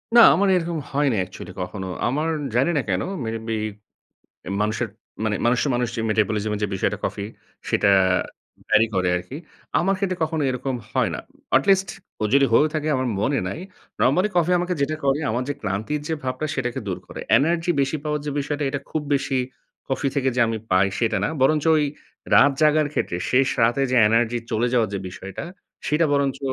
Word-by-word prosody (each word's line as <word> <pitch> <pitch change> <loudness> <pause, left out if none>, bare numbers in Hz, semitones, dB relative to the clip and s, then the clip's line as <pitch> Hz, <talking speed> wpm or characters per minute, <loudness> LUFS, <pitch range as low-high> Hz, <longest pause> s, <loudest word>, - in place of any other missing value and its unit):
না, - - +9 0.2
আমার 200 +4 +2
এইরকম 170 -1 -1
হয়নি 140 -3 +1
actually 90 0 -10
কখনো। 95 +1 -5 0.2
আমার 150 +6 0 0.3
জানি 135 +6 +3
না - - +2
কেন, 90 -1 +1 0.2
maybe 115 0 -3 1.0
এ - - -4
মানুষের 110 +3 0 0.4
মানে 105 -1 0
মানুষের 125 +4 +2
মানুষ 120 0 0 0.2
metabolism 105 0 0
যে - - +2
বিষয়টা 95 - -1
কফির, 100 +1 -3 0.4
সেটা - - +2 0.8
vary 110 +1 +5
করে 90 -1 +1
আরকি। 90 +10 -6 0.4
আমার 195 +3 +2
ক্ষেত্রে 190 -2 -1
কখনো 160 -1 0
এরকম 130 +1 -3 0.2
হয় - - +1
না। - - -4 0.4
At 135 - +3
least 195 -1 +4 0.3
ও - - +2
যদি 140 0 +5
হয়েও 145 +7 +5
থাকে 155 0 -1
আমার 130 0 0
মনে 140 +6 +1
নাই। 125 - -5 0.4
Normally 180 +10 +3
coffee 175 +1 +3
আমাকে 180 +1 -1
যেটা 155 +3 0
করে 135 +1 +2
আমার 120 +3 -1
যে 145 - -1
ক্লান্তির 110 +9 -2
যে 160 - 0
ভাবটা 130 +4 -2
সেটাকে 125 -2 -2
দূর 95 -3 -2
করে। - - -8 0.2
Energy 170 +4 +1
বেশি 140 +3 0
পাওয়ার 150 0 -1
যে - - -1
বিষয়টা 145 +1 -3
এটা 140 0 -3
খুব 155 - -1
বেশি 135 -1 0 0.5
coffee 135 +1 0
থেকে 135 -1 +2
যে - - +2
আমি 115 0 -2
পাই 95 +1 +4
সেটা 115 -2 +1
না। - - +1
বরঞ্চ 150 +3 +3 0.2
এই - - +2 0.5
রাত 140 +1 +6
জাগার 155 0 +4
ক্ষেত্রে 90 - -1
শেষ 130 +1 +4
রাতে 120 +4 +3
যে 130 - +2
energy 115 +2 +2
চলে 115 +2 +1
যাওয়ার 115 -3 +2
যে - - -1
বিষয়টা 95 +3 -8 0.4
সেটা 150 +3 +2
বরঞ্চ 140 -2 +1
135 Hz, 185 wpm, -23 LUFS, 110-150 Hz, 1.0 s, না